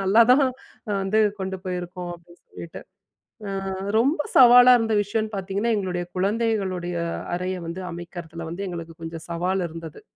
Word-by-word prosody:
நல்லா 200 +5 +6
தான், 270 0 +5 0.6
வந்து 210 +3 +2 0.2
கொண்டு 190 0 -3
போயிருக்கோம். 180 -1 -5
அப்படின்னு 170 0 -18
சொல்லிவிட்டு. 170 - -9 0.7
அ, - - -3 0.5
ரொம்ப 285 +6 +2 0.2
சவாலா 245 0 +9
இருந்த 225 -1 0
விஷயனு 215 +2 -2
பாத்திங்கன்னா, 195 +4 -1
எங்களுடைய 180 -2 -2
குழந்தைகளுடைய 195 -4 -1 0.4
அறைய 185 +1 -3
வந்து, 175 +3 -5
அமைக்கிறதல 170 -1 -7
வந்து, 185 +4 -5
எங்களுக்கு 165 -2 -7
கொஞ்சம் 165 0 -7
சவால் 180 +2 0
இருந்தது. 165 -1 -9
185 Hz, 135 wpm, -24 LUFS, 175-215 Hz, 0.7 s, சவாலா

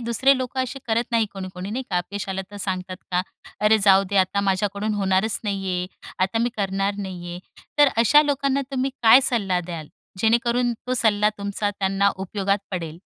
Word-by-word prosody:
दुसरे 245 +4 +3
लोक 255 0 -5
असे 260 +1 -2
करत 230 +1 0
नाही, 225 -1 +3
कोणी-कोणी 185 0 -7
नाही 255 +4 -3
का? 180 - 0
अपयश 200 +3 -5
आलं 190 0 -2
तर 205 - -9
सांगतात 185 -1 -3
का, 180 0 +1 0.4
"अरे 215 +1 +4
जाऊ 195 0 +6
दे, 200 - 0
आता 190 +1 +2
माझ्याकडून 200 +2 -1
होणारच 195 +2 +1
नाही 195 -2 -2
आहे. 180 0 -1 0.4
आता 195 +4 -2
मी 240 - 0
करणार 195 0 -1
नाही 180 -3 -6
आहे." 175 - -6 0.4
तर 290 - +7
अशा 260 +7 +6
लोकांना 275 -1 0
तुम्ही 265 0 -1
काय 230 +4 +8
सल्ला 195 -6 0
द्याल, 165 -4 -6 0.3
जेणेकरून 235 +2 +2
तो 255 - 0
सल्ला 210 -3 +3
तुमचा 200 +1 -2
त्यांना 195 0 +1
उपयोगात 195 +1 -1
पडेल? 165 -3 -5
200 Hz, 185 wpm, -23 LUFS, 190-235 Hz, 0.4 s, काय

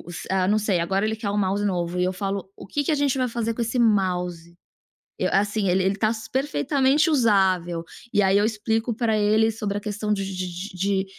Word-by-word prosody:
o - - -13 0.3
ah, 190 0 +1
não 215 +1 +3
sei, 200 -4 0
agora 190 +4 0
ele 220 0 -1
quer 215 -2 -4
um 205 - -2
mouse 200 +1 0
novo 180 -2 -1
e - - +2
eu 185 +1 -1
falo: 195 0 -4
"O - - -11
que 290 +9 -1
que 290 - -1
a - - +3
gente 280 -2 +1
vai 255 -1 +1
fazer 230 -1 -2
com 235 - -6
esse 230 +2 -1
mouse?". 180 -6 0 0.6
Eu - - +1
assim, 205 +1 +1
"ele 185 +1 +2
ele 195 +1 +1
está 215 +2 +1 0.2
perfeitamente 280 +2 +2
usável", 190 - +2 0.3
e 205 - +4
aí 190 +1 +4
eu 205 - +3
explico 225 +2 -1
para 225 -2 +1
ele 215 +2 +3
sobre 210 -2 -3
a - - -4
questão 210 0 -2
de 195 -1 -2
de 185 -1 -4 0.3
de 190 +1 0
205 Hz, 225 wpm, -24 LUFS, 190-225 Hz, 0.6 s, e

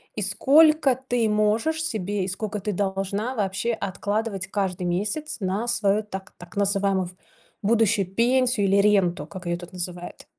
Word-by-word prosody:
и 210 - -3
сколько 280 - +4
ты 245 -3 -1
можешь 215 +10 +1
себе, 205 - -2
и - - -3
сколько 210 +2 -4
ты 210 +2 -2
должна, 200 +5 -2
вообще, 205 +2 -1
откладывать 200 0 -3
каждый 190 -2 -2
месяц, 205 - -2
на 195 +5 -1
свою, 215 -3 +1
так 190 -2 -8
так 175 +3 -13
называемую, 195 -2 +1 0.5
будущую 210 -2 +2
пенсию, 245 -3 +2
или 195 +1 +3
ренту, 185 -7 +2
как 180 +2 -9
ее 175 0 -1
тут 175 0 -11
называют. 180 -1 -6
205 Hz, 150 wpm, -24 LUFS, 190-230 Hz, 0.5 s, сколько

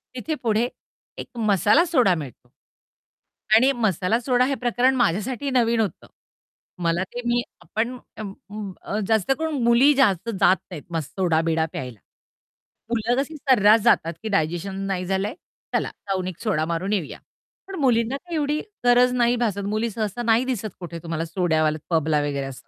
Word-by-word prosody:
तिथे 310 +5 -3
पुढे 225 +1 +2 0.5
एक 245 - -9
मसाला 215 - +3
सोडा 250 - +3
मिळतो 140 -7 -9 1.1
आणि 260 +5 +5
मसाला 220 - 0
सोडा 250 0 +2
हे 275 0 0
प्रकरण 245 +2 +1
माझ्यासाठी 240 +5 0
नवीन 235 -2 +2
होतं. 205 -7 -2 0.8
मला 170 +2 +1
ते 245 +6 -7
मी 240 0 +2 0.2
आपण 225 +8 -3 0.2
अं, 210 -3 -5 0.2
उम्म, 205 -2 -6
अ, 210 - -3
जास्त 220 +2 +2
करून 315 -5 -2
मुली 240 +5 +5
जास्त 230 -6 +2
जात 190 - +5
नाहीत 155 -5 -7
मस 160 -4 -2
सोडा-बिडा 165 -3 +1
प्यायला. 125 -5 -6 0.9
मुलं 235 +1 0
कशी 310 +3 -6
सर्रास 225 -6 +5
जातात, 170 -8 +3
की 220 - -3
डायजेशन 175 +4 -1
नाही 185 -2 -2
झालं 190 +2 0
आहे 245 - -6 0.4
चला - - +1 0.2
जाऊन 185 -1 -1
एक 185 -2 -7
सोडा 190 -9 0
मारून 170 +5 -2
येऊया. 180 -8 -3 0.5
पण 390 - -7
मुलींना 245 -1 +2
ते 345 +2 -8
एवढी 300 0 0 0.3
गरज 245 +1 +5
नाही 240 0 +3
भासत 200 -4 -1
मुली 225 +2 0
सहसा 215 +2 -3
नाही 230 +2 +3
दिसत 225 -5 -2
कुठे 170 -1 -7
तुम्हाला 165 -1 -3
सोड्यावाल्या 160 -2 0 0.2
पबला 155 -1 +2
वगैरे 140 -2 -2
असं. 130 -2 -10
215 Hz, 165 wpm, -23 LUFS, 175-245 Hz, 1.1 s, आणि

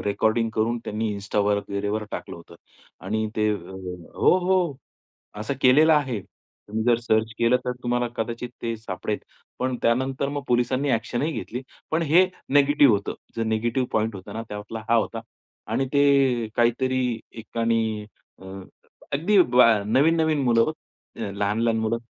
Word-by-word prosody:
Recording 110 +3 +1
करून 115 +2 0
त्यांनी 110 +1 -2
इन्स्टावर 100 +1 0
वगैरे 100 +2 -3
टाकलं - - -6
होतं 85 0 -14 0.5
आणि 110 +2 -1
ते 110 0 +2
अ 105 - -1 0.6
हो, - - +4
हो 180 -5 +1 0.7
असं 110 +6 -2
केलेलं 150 +5 +6
आहे. 130 -9 0 0.5
तुम्ही 110 +2 -2
जर 120 -1 +4
सर्च 110 -1 +1
केलं 120 +2 +3
तर 125 - 0
तुम्हाला 120 0 0
कदाचित 115 +2 -3
ते 115 -1 -2
सापडेल. 110 -1 -4 0.4
पण 130 0 0
त्यानंतर 130 +3 +1
मग 145 0 -4
पोलिसांनी 125 +3 +1
ॲक्शनही 120 +6 -1
घेतली. 125 -3 -5 0.3
पण 160 +1 +1
हे 165 +4 +5 0.3
निगेटिव्ह 145 -2 +5
होतं. 100 - -3 0.2
जो 115 - -1
निगेटिव्ह 115 +3 0
पॉइंट 110 0 0
होता 95 -1 -9
ना 115 - -4
तो 105 - -5
आपला 110 +2 -7
हा 115 - +5
होता 115 0 0 0.5
आणि 135 - +1
ते 135 -5 +3
काहीतरी 125 0 +1 0.2
एकानी 115 -1 -1 0.4
अ, 95 - -12 0.7
अगदी 175 +9 +2
ब 125 -6 +4 0.2
नवीन-नवीन 155 +5 +3
मुलं 115 -2 +4
हो. 155 +6 +1 0.5
लहान-लहान 105 +3 0
मुलं 110 +1 0
115 Hz, 150 wpm, -24 LUFS, 110-135 Hz, 0.7 s, केलेलं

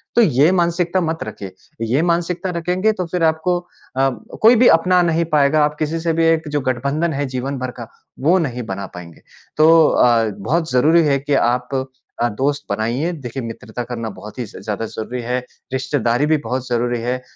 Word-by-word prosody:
तो 235 - +6
ये 150 - +4
मानसिकता 175 0 +1
मत 165 -1 -2
रखिए। 100 -3 -8 0.4
ये 130 +6 +2
मानसिकता 175 +2 0
रखेंगे 180 +5 +1
तो 185 -3 -3
फिर 175 0 -2
आपको 160 +3 +2
अ, 135 -6 -3 0.3
कोई 230 +3 +7
भी 245 +2 +5
अपना 180 +2 +4
नहीं 170 0 +1
पाएगा। 150 +1 +4
आप 150 0 -2
किसी 160 +2 -1
से 165 0 0
भी 165 0 +2
एक 160 -1 +2
जो 145 -1 -1
गठबंधन 140 +6 -1
है 145 +1 -1
जीवन 130 +2 -4
भर 130 0 -3
का 115 - -7 0.3
वो 165 +7 +3
नहीं 125 -7 -3
बना 100 -1 -5
पाएँगे। 85 -2 -11 0.4
तो 160 0 +6
अ, 120 -2 +4
बहुत 160 - -1
ज़रूरी 155 +7 +4
है 140 -1 +2
कि 145 +2 -2
आप 125 -1 +1 0.5
अ, 120 - +2
दोस्त 140 +6 -1
बनाइए। 120 +11 -1
देखिए 135 -4 -6
मित्रता 115 +1 -6
करना 115 -2 -5
बहुत 105 +4 -10
ही 125 - -2
ज़ 105 - -12
ज़्यादा 105 +2 -3
ज़रूरी 115 +3 -5
है। 125 +2 -1 0.3
रिश्तेदारी 130 -1 0
भी 155 0 +3
बहुत 130 0 -2
ज़रूरी 120 0 0
है। 125 +2 -2
140 Hz, 195 wpm, -19 LUFS, 120-165 Hz, 0.5 s, कोई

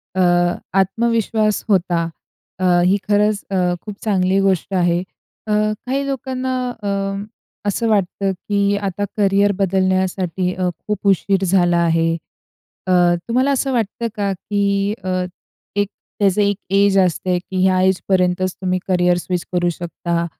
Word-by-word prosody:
अ, 190 - +2 0.6
आत्मविश्वास 220 +1 +1
होता. 175 -4 +2 0.6
अ, 185 - 0 0.2
ही 190 +3 +4
खरंच 210 0 +2
अ, - - 0 0.3
खूप 210 -2 -7
चांगली 190 -2 +2
गोष्ट 195 -1 0
आहे. 175 -2 +2 0.5
अ, - - -2 0.3
काही 270 +2 -1
लोकांना 260 -1 -2 0.3
अ, 200 - -1 0.8
असं 225 +3 0
वाटतं, 195 -1 +1
की 200 +2 0
आता 200 0 -2
करिअर 200 0 +3
बदलण्यासाठी 185 -1 0
अ, 180 -1 -1 0.2
खूप 210 -1 -2
उशीर 195 0 +2
झाला 175 -2 +3
आहे. 165 0 +2 0.8
अ, - - +1 0.4
तुम्हाला 255 +4 +2
असं 270 0 0
वाटतं 230 0 -1
का, 200 -1 -1
की 200 +1 0
अ, 185 -1 -1 0.5
एक 205 -1 +1 0.3
त्याचं 200 0 +3
एक 200 -1 +1
एज 200 0 +4
असते, 180 +1 0
की 185 +1 -2
ह्या 185 -1 +3
एजपर्यंतच 185 -1 +1
तुम्ही 185 -1 0
करिअर 180 -1 +3
स्विच 180 0 -3
करू 175 -1 +2
शकता. 170 0 -2
195 Hz, 135 wpm, -19 LUFS, 185-205 Hz, 0.8 s, ही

